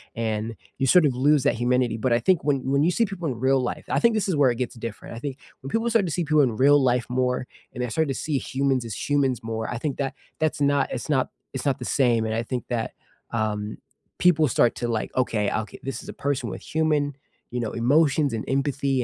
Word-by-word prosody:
and 110 Hz, 0 st, -2 dB, 0.2 s
you 135 Hz, -, +2 dB
sort 175 Hz, +4 st, +6 dB
of 140 Hz, -, +2 dB
lose 145 Hz, +2 st, +3 dB
that -, -, +2 dB
humanity. 120 Hz, -1 st, +1 dB
But 130 Hz, 0 st, +2 dB
I 120 Hz, -, +3 dB
think 185 Hz, 0 st, +2 dB
when 140 Hz, -1 st, +2 dB
when 140 Hz, +1 st, +3 dB
you 165 Hz, -, +4 dB
see 230 Hz, +6 st, +2 dB
people 190 Hz, -5 st, -5 dB
in 125 Hz, -5 st, -3 dB
real 130 Hz, +1 st, +3 dB
life 125 Hz, -, -4 dB
I -, -, +2 dB
think 235 Hz, -1 st, +3 dB
this 215 Hz, -, 0 dB
is 185 Hz, -, +1 dB
where 145 Hz, -3 st, +4 dB
it 120 Hz, -, -4 dB
gets 125 Hz, -1 st, -2 dB
different. 115 Hz, -1 st, -7 dB
I -, -, -6 dB
think 135 Hz, +1 st, -5 dB, 0.2 s
when 135 Hz, -, -7 dB
people 225 Hz, +6 st, 0 dB
start 225 Hz, -4 st, +3 dB
to -, -, -3 dB
see 175 Hz, +3 st, 0 dB
people 155 Hz, 0 st, +4 dB
in 120 Hz, -6 st, +1 dB
real 145 Hz, +3 st, +5 dB
life 125 Hz, -1 st, +2 dB
more, 125 Hz, 0 st, 0 dB, 0.3 s
and 125 Hz, -, -3 dB
they 125 Hz, -, -2 dB
start 160 Hz, +8 st, 0 dB
to 135 Hz, -, -1 dB
see 145 Hz, 0 st, -1 dB
humans 135 Hz, -2 st, 0 dB
as 110 Hz, -4 st, -5 dB
humans 135 Hz, -5 st, +1 dB
more, 110 Hz, 0 st, -3 dB
I 120 Hz, -, -3 dB
think 140 Hz, +2 st, -3 dB
that 135 Hz, -1 st, -2 dB, 0.2 s
that's 155 Hz, -1 st, 0 dB
not 140 Hz, -1 st, +2 dB
it's 120 Hz, -, -5 dB
not 135 Hz, -4 st, +2 dB, 0.2 s
it's 135 Hz, 0 st, -4 dB
not 140 Hz, -2 st, +1 dB
the 125 Hz, -, -5 dB, 0.2 s
same. 120 Hz, -3 st, +3 dB
And 110 Hz, -, -1 dB
I 115 Hz, -, 0 dB
think 125 Hz, +1 st, -3 dB
that, 115 Hz, -2 st, -2 dB, 0.4 s
um, 110 Hz, -2 st, -2 dB, 0.4 s
people 160 Hz, -4 st, +4 dB
start 120 Hz, -2 st, +3 dB
to 120 Hz, -, -1 dB
like, 115 Hz, -2 st, -2 dB
"Okay, 115 Hz, -5 st, +1 dB
oka 110 Hz, 0 st, -3 dB
this 135 Hz, -, -4 dB
is -, -, -11 dB
a -, -, -5 dB
person 135 Hz, -4 st, 0 dB
with 95 Hz, +1 st, -7 dB
human, 150 Hz, -3 st, +1 dB, 0.4 s
you 125 Hz, -, -2 dB
know, 115 Hz, -3 st, -2 dB
emotions 140 Hz, +3 st, +3 dB
and 110 Hz, -, -2 dB
empathy 135 Hz, -1 st, 0 dB
130 Hz, 250 wpm, -25 LUFS, 120-145 Hz, 0.4 s, sort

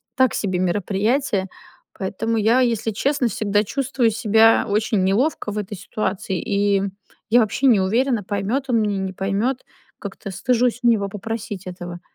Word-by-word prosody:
Так 260 Hz, -3 st, +3 dB
себе 190 Hz, -3 st, -1 dB
мероприятие, 205 Hz, +4 st, 0 dB, 0.5 s
поэтому 225 Hz, +4 st, -2 dB
я, 225 Hz, +4 st, +3 dB
если 230 Hz, -2 st, 0 dB
честно, 270 Hz, +4 st, 0 dB
всегда 210 Hz, -2 st, 0 dB
чувствую 255 Hz, 0 st, 0 dB
себя 225 Hz, 0 st, +4 dB
очень 210 Hz, -1 st, +1 dB
неловко 210 Hz, +5 st, 0 dB
в 210 Hz, -, -5 dB
этой 205 Hz, 0 st, -4 dB
ситуации, 190 Hz, -1 st, -3 dB
и 200 Hz, -2 st, +1 dB, 0.5 s
я 240 Hz, +3 st, +5 dB
вообще 225 Hz, +4 st, 0 dB
не 230 Hz, -6 st, +5 dB
уверена 230 Hz, +3 st, +1 dB
поймёт 205 Hz, +7 st, -2 dB
он 230 Hz, -3 st, +3 dB
меня, 205 Hz, -2 st, 0 dB
не 190 Hz, 0 st, -3 dB
поймет, 200 Hz, +8 st, -1 dB, 0.3 s
как-то 200 Hz, 0 st, -7 dB
стыжусь 245 Hz, +5 st, +1 dB
у 240 Hz, -, +4 dB
него 205 Hz, -4 st, +1 dB
попросить 210 Hz, -1 st, -6 dB
этого, 175 Hz, -1 st, -7 dB
210 Hz, 155 wpm, -21 LUFS, 195-235 Hz, 0.5 s, я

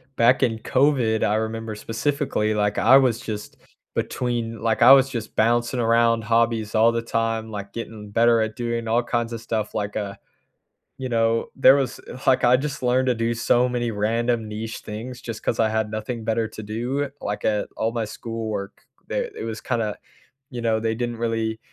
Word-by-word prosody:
back 120 Hz, +3 st, +4 dB
in 115 Hz, -3 st, +1 dB
COVID, 125 Hz, -4 st, +2 dB
I 105 Hz, -, +2 dB
remember 110 Hz, 0 st, -3 dB
specifically, 115 Hz, 0 st, -1 dB
like, 105 Hz, -1 st, 0 dB
I 135 Hz, +2 st, +7 dB
was 125 Hz, -4 st, +2 dB
just 105 Hz, -3 st, -6 dB, 0.4 s
between, 120 Hz, -2 st, -2 dB
like 115 Hz, 0 st, 0 dB
I 125 Hz, -, +9 dB
was 135 Hz, 0 st, +5 dB
just 115 Hz, -4 st, -6 dB
bouncing 120 Hz, +3 st, +2 dB
around 115 Hz, 0 st, +3 dB
hobbies 115 Hz, -1 st, +1 dB
all 115 Hz, +2 st, +5 dB
the 115 Hz, 0 st, -1 dB
time, 115 Hz, -1 st, -1 dB
like, 100 Hz, -2 st, -7 dB
getting 110 Hz, -3 st, -7 dB
better 115 Hz, +1 st, +4 dB
at 110 Hz, -1 st, -2 dB
doing 120 Hz, -1 st, -3 dB
all 115 Hz, +2 st, +2 dB
kinds 120 Hz, -1 st, -2 dB
of 115 Hz, -, -5 dB
stuff, 110 Hz, -2 st, -3 dB
like, 105 Hz, -1 st, -3 dB
uh, 100 Hz, -2 st, -3 dB, 0.9 s
you 130 Hz, -1 st, -4 dB
know, 115 Hz, -1 st, +1 dB
there 135 Hz, -, +7 dB
was, 135 Hz, -4 st, -1 dB
e -, -, -8 dB
like, 130 Hz, -1 st, +4 dB
I 125 Hz, +1 st, +6 dB
just 145 Hz, +1 st, -3 dB
learned 125 Hz, +1 st, +2 dB
to 125 Hz, -, +2 dB
do 115 Hz, +1 st, 0 dB
so 120 Hz, +2 st, +2 dB
many 120 Hz, -1 st, -1 dB
random 115 Hz, +2 st, 0 dB
niche 110 Hz, +1 st, -5 dB
things 120 Hz, +4 st, -7 dB
just 115 Hz, -2 st, -6 dB
'cause 115 Hz, -, -1 dB
I 110 Hz, -1 st, +3 dB
had 110 Hz, -1 st, -1 dB
nothing 110 Hz, +2 st, -4 dB
better 110 Hz, 0 st, 0 dB
to 110 Hz, -, -9 dB
do, 120 Hz, +7 st, -2 dB
like, 105 Hz, 0 st, -4 dB
at 105 Hz, -1 st, +1 dB
all 110 Hz, +1 st, 0 dB
my 115 Hz, -2 st, -1 dB
schoolwork, 110 Hz, -2 st, -5 dB, 0.3 s
eh, -, -, -1 dB
it -, -, -6 dB
was 110 Hz, -1 st, -4 dB
kinda, 115 Hz, -4 st, -1 dB, 0.6 s
you 125 Hz, -, -5 dB
know, 110 Hz, -1 st, +1 dB
they 110 Hz, 0 st, 0 dB
didn't 120 Hz, 0 st, -3 dB
really 115 Hz, -1 st, -1 dB
115 Hz, 195 wpm, -23 LUFS, 110-120 Hz, 0.9 s, I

